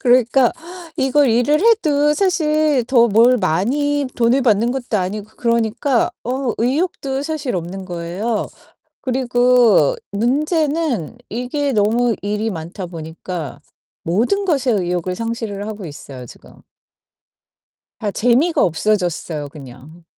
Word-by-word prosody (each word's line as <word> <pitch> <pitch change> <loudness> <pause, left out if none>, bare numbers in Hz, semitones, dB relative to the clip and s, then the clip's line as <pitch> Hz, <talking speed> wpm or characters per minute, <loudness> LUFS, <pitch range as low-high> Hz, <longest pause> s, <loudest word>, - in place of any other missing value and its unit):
그러니까 250 0 +4 0.5
이걸 270 +1 +3
일을 245 +6 +2
해도 300 -10 +3
사실 310 -7 +2
더 235 -2 +5
뭘 230 +4 +5
많이 280 - 0
돈을 245 +3 +3
받는 230 -1 +2
것도 245 -4 -2
아니고 200 +2 -3
그러니까 235 +2 +1
어 255 0 -1
의욕도 270 +1 -1
사실 295 -5 -3
없는 180 +2 -5
거예요. 180 +5 -3 0.5
그리고 250 - +3 0.2
문제는 285 - 0
이게 260 +5 -2
너무 230 +2 +2
일이 210 +2 -1
많다 175 +1 -6
보니까 165 -1 -7 0.5
모든 240 - +1
것의 270 - +1
의욕을 180 0 -2
상실을 225 -3 -4
하고 210 -3 -6
있어요, 140 -4 -9
지금. - - -15 1.5
다 210 - -2
재미가 245 - +2
없어졌어요, 175 -4 -1
그냥. 140 +3 -13
235 Hz, 255 characters per minute, -19 LUFS, 190-275 Hz, 1.5 s, 더